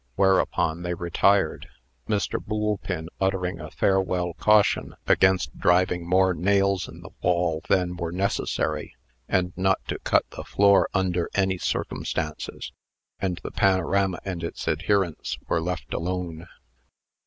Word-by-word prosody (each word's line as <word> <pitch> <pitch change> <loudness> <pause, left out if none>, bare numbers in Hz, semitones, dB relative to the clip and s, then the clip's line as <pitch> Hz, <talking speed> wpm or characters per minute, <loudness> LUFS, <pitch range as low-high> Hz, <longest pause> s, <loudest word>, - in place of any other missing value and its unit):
Whereupon 95 -3 +2
they 90 0 -2
retired 95 +4 +1 0.4
Mr. 105 -2 -1
Boolpin 105 -6 -2
uttering 95 -2 -1
a - - -7
farewell 90 -2 +1
caution 105 +2 +3
against 95 -6 +2
driving 90 -1 +2
more 95 0 +4
nails 100 +2 +1
in - - -12
the - - -11
wall 85 -3 +1
than 90 -1 +2
were 85 -2 -4
necessary, 100 +3 -1 0.3
and 90 -1 +1
not 95 0 +2
to - - -2
cut - - +2
the - - -7
floor 100 0 +4
under 90 -3 0
any 95 -2 +1
circumstances 75 -3 -3 0.5
and 90 -2 -2
the - - -5
panorama 95 0 +2
and 90 -3 -4
its 85 - -5
adherents 90 +1 0
were 80 - +1
left 80 -7 -4
alone. 85 -1 -3
90 Hz, 130 wpm, -25 LUFS, 85-95 Hz, 0.5 s, more